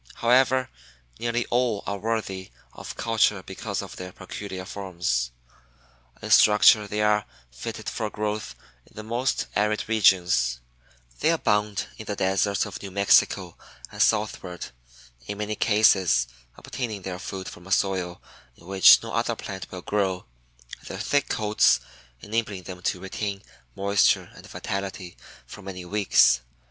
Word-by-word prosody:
However, 130 +2 +3 0.5
nearly 120 0 -1
all 120 -4 +1
are 100 0 -3
worthy 100 -3 -3 0.2
of - - -8
culture 110 -4 +1
because 95 - -5
of - - -10
their 90 0 -7
peculiar 95 0 -7
forms. 85 -12 -2 0.9
In - - -4
structure 105 0 +6
they 105 +1 -2
are 105 0 +2 0.3
fitted 110 - -7
for 110 -2 -2
growth 105 0 -4 0.3
in - - -24
the 110 - -7
most 120 +4 -1
arid 105 +1 0
regions; 90 - +3 0.6
they 155 - +2
abound 105 -10 +1
in 110 - -7
the 105 - -3
deserts 95 +1 +1
of - - -8
New 100 - -6
Mexico 100 +1 +3 0.4
and - - -4
southward, 100 - 0 0.6
in 100 - -5
many 105 0 -2
cases 100 - +4 0.3
obtaining 110 -7 -5
their 90 -1 -5
food 95 0 -6
from 90 +2 -10
a - - -10
soil 95 -3 0 0.4
in - - -19
which 95 +1 +7
no - - -6
other - - 0
plant 95 -1 -7
will 90 -1 -8
grow, 95 -3 -1 0.6
their - - -6
thick 145 -1 0
coats 105 - +3 0.4
enabling 105 -3 -3
them 90 0 -9
to 90 - -1
retain 100 +1 -4 0.3
moisture 100 +1 +2
and - - -14
vitality 95 -2 -5 0.3
for - - -11
many 95 -2 -8
weeks. 90 -10 +4
100 Hz, 140 wpm, -25 LUFS, 95-110 Hz, 0.9 s, which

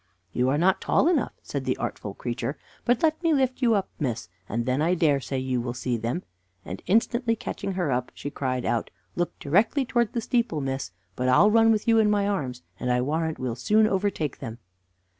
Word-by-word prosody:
"You 125 +1 +2
are 140 - +2
not 185 +4 +3
tall - - +3
enough," 350 - +1
said - - -4
the - - -1
artful - - -4
creature; - - -3 0.3
"but 245 +2 +2
let 315 0 +2
me 330 -3 +3
lift 260 -1 0
you 235 -3 +4
up, 195 -2 0
miss, 120 - -2 0.2
and 115 +2 -1
then 130 +3 +1
I 170 +3 +3
dare 150 -5 +3
say 135 0 -4
you 130 -1 -1
will 120 0 -4
see 125 0 -1
them;" 120 +9 -2 0.4
and, 90 +2 -6
instantly 230 +4 +2
catching 200 -2 -4
her 180 -6 -1
up, 125 0 -1
she 145 - -6
cried 130 -3 -2
out: 115 0 0 0.3
"Look 175 0 -2
directly 210 - +2
towards 235 -3 +1
the 235 - -1
steeple, 235 - 0
miss; 135 -1 -3 0.3
but 125 0 0
I'll 205 +12 +6
run 225 0 +5
with 215 0 0
you 225 -1 +5
in 215 -1 +4
my 205 -1 +2
arms, 130 -11 -2 0.2
and 125 - -1
I 125 - +2
warrant 160 +5 -1
we'll 125 -2 -2
soon 210 - +3
overtake 190 -8 -1
them." 115 -4 -6
165 Hz, 215 wpm, -26 LUFS, -, 0.4 s, I'll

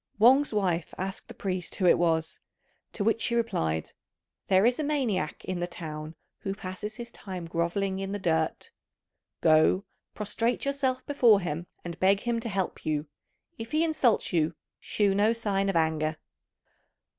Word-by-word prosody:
Wang's 260 +7 +6
wife 180 -6 0
asked 190 +1 -4
the - - -9
priest 185 -2 -3
who 190 - 0
it 175 - +6
was; 160 -2 +1 0.5
to 205 - -2
which 225 +2 +2
he 235 - 0
replied, 80 - -1 0.6
"There 190 +2 +4
is 245 +3 +3
a - - 0
maniac 245 - -1
in 185 -1 -3
the 175 - -1
town 155 -2 -7 0.2
who 195 0 -3
passes 200 +2 -6
his 235 +1 -8
time 185 -3 -7
grovelling 175 +4 -1
in 195 0 -3
the 205 - -1
dirt. 160 -4 -1 0.7
Go, 160 +5 +4 0.3
prostrate 225 +5 -1
yourself 270 -2 -1
before 240 -8 +5
him, 170 -1 -4 0.2
and 170 -1 -6
beg 195 +2 +4
him 235 -1 0
to 230 0 -4
help 195 -3 -2
you. 150 -1 -1 0.5
If 225 +3 -7
he 310 +1 +3
insults 280 - +2
you, 165 -1 +2 0.2
shew 205 -2 +1
no 210 +3 +3
sign 200 -4 0
of 195 - -1
anger." 160 -1 +1
195 Hz, 165 wpm, -28 LUFS, 170-230 Hz, 0.7 s, Wang's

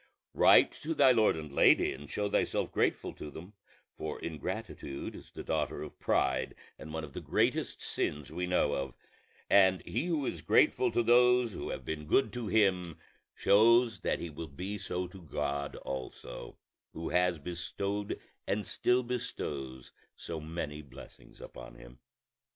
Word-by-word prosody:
Write - - +6
to 160 +2 -4
thy 135 -3 +6
lord 110 -7 +4
and 75 -2 -7
lady, - - +5
and 70 +2 -11
show 105 0 -1
thyself - - 0
grateful - - 0
to 75 - -8
them: 85 +7 -10 0.4
for 80 -1 -5
ingratitude 70 -3 -5
is - - -12
the - - -8
daughter - - -1
of - - -10
pride, 65 -1 +1 0.2
and 80 - -9
one 80 0 -4
of 70 -3 -9
the - - -5
greatest - - 0
sins 75 -1 -2
we 90 +3 -3
know 90 -5 +2
of; 70 -2 -3 0.5
and 95 -2 +5
he 175 - -2
who 160 -5 0
is 85 - -3
grateful 75 - +4
to 120 - +2
those 125 -1 +5
who - - -5
have - - -5
been 75 -1 -4
good 135 - +3
to 120 -3 -4
him 95 -6 +2 0.4
shows 115 +2 +5
that - - 0
he 85 - -6
will 80 +2 -7
be 90 +9 -5
so 90 -1 -3
to 95 +1 -11
God 70 -3 -3
also, 65 -2 -7 0.4
who 80 - -4
has 90 -1 +2
bestowed 100 +6 -4 0.3
and 105 +1 -1
still 125 +1 +2
bestows 70 - -5 0.2
so 85 -2 -6
many 75 -1 -5
blessings 70 -4 -14
upon - - -10
him. - - -14
85 Hz, 160 wpm, -31 LUFS, 75-105 Hz, 0.5 s, Write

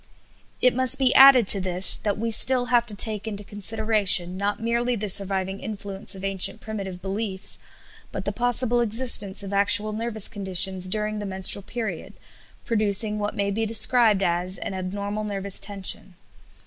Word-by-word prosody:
It 250 - +4
must 260 0 +2
be 265 -1 +1
added 265 -5 +6
to 200 - +5
this 185 0 +3
that 205 -2 -3
we 230 +2 -4
still 250 +3 +4
have 240 -1 +2
to 210 - -4
take 215 +1 -1
into 205 -1 -7
consideration 205 -3 +1
not 200 +1 -4
merely 235 +2 -2
the 210 -1 -5
surviving 195 0 +1
influence 200 -1 -4
of 190 - -11
ancient 195 -1 0
primitive 195 -4 -8
beliefs, 195 0 -4 0.5
but 190 - -7
the 205 - -2
possible 245 +1 0
existence 220 -4 0
of 200 0 -8
actual 205 +1 +3
nervous 220 -1 -1
conditions 190 -2 0
during 210 +2 -3
the 205 - -6
menstrual 190 +1 +1
period, 200 -3 -7 0.5
producing 210 -1 0
what 205 0 -4
may 200 0 -2
be 225 +3 -3
described 225 -2 +4
as 175 +1 -2
an - - -7
abnormal 200 +3 -6
nervous 200 -2 -2
tension. 195 -2 -2
205 Hz, 160 wpm, -22 LUFS, 195-225 Hz, 0.5 s, added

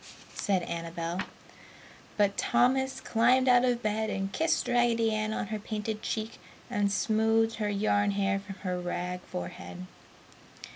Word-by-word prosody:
said 190 -4 0
Annabel. 170 +1 -3 1.0
But 200 -1 +3
Thomas 265 +2 +2
climbed 250 +3 +3
out 245 -1 +6
of 245 -1 +1
bed 215 +1 0
and 195 -1 -3
kissed 320 +6 +1
Raggedy 235 -2 +3
Ann 215 0 -1
on 210 - -3
her 215 -1 -3
painted 215 0 -4
cheek 220 0 -4 0.3
and 205 -4 +1
smoothed 225 +2 +2
her 210 -2 -1
yarn 205 0 +2
hair 200 0 +1
from 195 -1 -9
her 180 -1 -1
rag 180 +1 -3
forehead. 90 - -7
210 Hz, 140 wpm, -29 LUFS, 195-230 Hz, 1.0 s, out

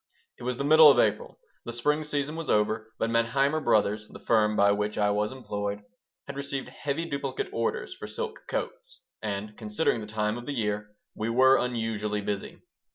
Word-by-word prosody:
It - - -10
was 125 0 -2
the 140 - -2
middle 155 +1 +8
of 135 - +5
April. 105 -3 +1 0.3
The 120 - -4
spring 150 +6 0
season 150 0 -2
was 165 -1 -5
over, 110 +1 +1
but 115 - -1
Manheimer 135 +6 +2
Brothers, 105 0 +2
the - - -11
firm 110 -2 +2
by 100 -1 +5
which 105 +1 -1
I 105 -1 +3
was 105 +1 0
employed, 105 -5 -4 0.4
had 140 - -7
received 140 -1 -4
heavy 150 +3 -3
duplicate 165 - -3
orders 470 +2 -2
for - - -8
silk 470 -1 -5
coats, - - -5 0.2
and, 105 0 -4
considering 105 +1 0
the 105 - -7
time 105 +1 -1
of 120 - -11
the 145 - -3
year, 105 -2 -2 0.2
we 110 +1 -3
were 130 +3 +6
unusually 110 -4 -1
busy. 100 0 -4
115 Hz, 185 wpm, -28 LUFS, 105-140 Hz, 0.4 s, middle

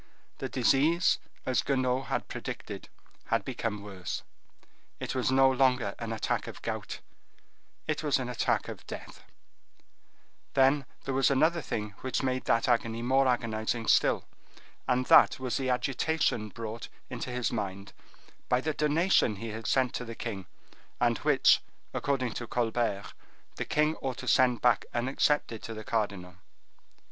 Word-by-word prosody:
The - - -3
disease, 160 +6 +3 0.3
as 130 -1 +2
Guenaud 130 -1 0
had - - -2
predicted, - - -6 0.4
had - - 0
become 105 -3 -3
worse; 95 -4 -5 0.8
it - - -3
was 130 -1 0
no 135 0 +5
longer 125 -5 +2
an 115 -1 -4
attack 110 - -1
of - - -8
gout, - - -4 0.8
it 155 -1 -1
was 150 -3 +2
an 130 -2 -3
attack 125 -2 0
of - - -8
death; - - -8 1.3
then 135 +1 +4 0.2
there 135 - -3
was 135 0 +3
another 160 +5 +3
thing 105 -4 -3
which 130 0 -1
made 130 -1 -1
that 115 0 +2
agony 115 -1 +1
more 135 +2 +3
agonizing 115 -2 0
still,—and 125 0 0
that - - +6
was 130 -2 -1
the 130 -1 -1
agitation 130 -3 0
brought 115 +1 -6 0.2
into 125 0 -4
his 125 -2 -1
mind 100 -3 -4 0.6
by 125 - +3
the 155 +4 -1
donation 150 - +3
he 115 +3 -6
had 110 -1 -6
sent 130 0 +2
to - - -3
the 115 -1 -7
king, 100 -7 -5 0.5
and - - +2
which, - - +4 0.3
according 130 -5 -1
to 120 - -5
Colbert, 115 -4 -1 0.4
the - - -2
king 150 +1 +2
ought 130 -3 -4
to - - -7
send 125 -2 +4
back 120 -4 +4
unaccepted 125 -1 +1
to 115 - -6
the 110 - -7
cardinal. 100 -5 -2
125 Hz, 150 wpm, -29 LUFS, 115-135 Hz, 1.3 s, that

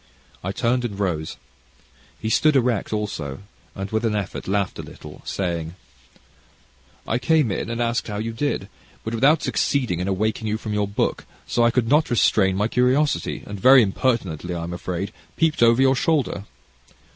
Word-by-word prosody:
I 95 - -2
turned 120 +4 0
and 100 -4 -4
rose. 85 -6 -2 0.8
He 110 - -3
stood 155 +3 +4
erect 125 -5 +1
also, 95 -9 -4 0.3
and 100 0 -5
with 110 +1 0
an 110 -2 +1
effort 100 -3 -4
laughed 100 0 -1
a - - -2
little, - - -11
saying: 85 -3 -3 1.3
"I 115 - 0
came 150 -3 +2
in 95 - -3
and 115 0 -3
asked 120 0 0
you - - -5
how - - -3
you 115 +1 -3
did, 115 -5 -2 0.4
but 110 - -4
without 140 +7 +3
succeeding 125 -11 0
in 90 - -2
awaking 110 +3 -1
you 105 +1 0
from 110 -1 -5
your 105 -1 0
book; 100 - -1 0.2
so 120 - +1
I 120 - +5
could 120 -1 +1
not 150 +5 +3
restrain 100 -5 +3
my 105 +2 +2
curiosity, 130 +5 +1
and 100 -1 -7
very 130 +4 +7
impertinently, 95 - -1
I'm 85 +1 -4
afraid, 90 +2 -4 0.2
peeped 160 -4 +1
over 115 +2 +5
your 135 0 +4
shoulder. 135 -8 0
110 Hz, 175 wpm, -23 LUFS, 95-125 Hz, 1.3 s, very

